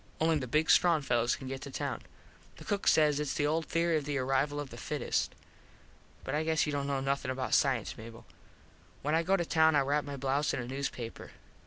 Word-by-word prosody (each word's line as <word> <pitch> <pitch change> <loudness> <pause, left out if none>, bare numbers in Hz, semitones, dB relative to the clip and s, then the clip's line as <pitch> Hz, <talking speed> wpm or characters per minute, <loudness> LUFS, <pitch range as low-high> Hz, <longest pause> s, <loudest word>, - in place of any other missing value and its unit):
Only 160 -1 +2
the 130 - -5
big 150 +6 +2
strong 165 -4 +4
fellos 120 -2 +1
can 135 - -9
get 135 0 -5
to 140 - -7
town. - - -4 0.6
The - - -12
cook 205 -1 -2
says 150 -2 +4
its 150 -2 -2
the 145 - +1
old 160 +2 0
theory 165 -1 +1
of 150 - -3
the 145 -1 -2
arrival 135 +3 0
of 145 -2 -6
the 120 - -9
fittest. 145 +1 -2 0.9
But 135 - -4
I 150 +1 +1
guess 160 -1 +1
you 150 - -2
dont 140 -1 -2
know 140 -1 -1
nothin 135 -1 -1
about 130 0 -2
cience, 130 -6 +2
Mable. 115 +1 -11 0.8
When 150 +2 0
I 165 - +4
go 190 +4 +2
to 175 - -1
town 160 -1 +4
I - - +5
wrap 145 +2 +1
my 140 -1 -6
blouze 140 +2 0
in - - -3
a 125 - -4
newspaper. 125 -3 -5
145 Hz, 225 wpm, -31 LUFS, 135-155 Hz, 0.9 s, I